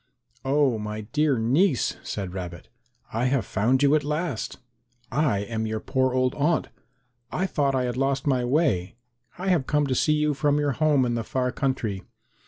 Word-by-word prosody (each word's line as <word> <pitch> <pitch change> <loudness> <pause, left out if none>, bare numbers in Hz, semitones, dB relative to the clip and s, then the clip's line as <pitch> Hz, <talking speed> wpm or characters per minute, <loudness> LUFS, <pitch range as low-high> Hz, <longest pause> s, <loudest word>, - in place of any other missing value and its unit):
"Oh, 135 -3 +2
my 105 0 -4
dear 145 +5 +1
niece," 130 - +2
said 95 -3 -5
Rabbit, 90 -3 -7 0.4
"I 115 +3 0
have 130 -4 +1
found 125 +9 +1
you 140 +1 +5
at 155 -1 +3
last. 150 -4 -3 0.5
I 130 -7 +1
am 110 +1 -3
your 110 0 -2
poor 130 +1 0
old 130 0 +2
aunt. 155 +3 +1 0.6
I 185 - 0
thought 140 -7 0
I 130 - +1
had 125 -1 -2
lost 135 0 0
my 130 -4 +2
way. 120 - +1 0.4
I 190 +2 -2
have 165 -8 +2
come 150 -1 +2
to 135 - 0
see 150 +4 +2
you 150 0 +1
from 145 +1 +1
your 145 -1 +1
home 145 -1 +2
in 120 - 0
the 115 -1 -1
far 125 +2 -1
country. 125 -9 -2
130 Hz, 185 wpm, -25 LUFS, 115-150 Hz, 0.6 s, you